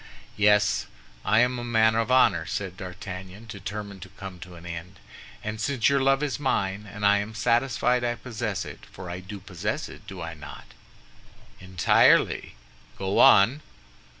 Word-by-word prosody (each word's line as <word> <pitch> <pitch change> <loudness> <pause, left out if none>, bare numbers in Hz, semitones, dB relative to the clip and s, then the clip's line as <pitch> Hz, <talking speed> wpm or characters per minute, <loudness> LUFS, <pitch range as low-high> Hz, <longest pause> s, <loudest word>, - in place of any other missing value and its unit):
"Yes; 105 0 +3 0.4
I 110 +4 +4
am 125 0 +1
a - - -5
man 110 -2 +3
of 115 +1 0
honor," 95 -10 +4
said 95 -3 -4
D'Artagnan, 95 +2 -8
determined 100 -2 -7
to - - -9
come 95 -2 -9
to 90 0 -11
an 85 0 -13
end, 85 +2 -7 0.5
"and 105 +1 -4
since 130 -3 +2
your 140 -1 +2
love 135 +2 +3
is 145 -1 -2
mine, 105 -7 -1
and 105 0 -4
I 100 0 +5
am 110 +2 -5
satisfied 120 +1 +1
I 120 0 0
possess 115 -4 -4
it—for 90 -1 -10
I 90 - -5
do 100 +2 -9
possess 105 - -4
it, - - -13
do 95 -1 -8
I 80 0 -5
not?" 75 -2 -11 0.9
"Entirely; 95 -8 +3 0.4
go 95 +1 -1
on." 115 +10 +6
105 Hz, 160 wpm, -26 LUFS, 95-120 Hz, 0.9 s, on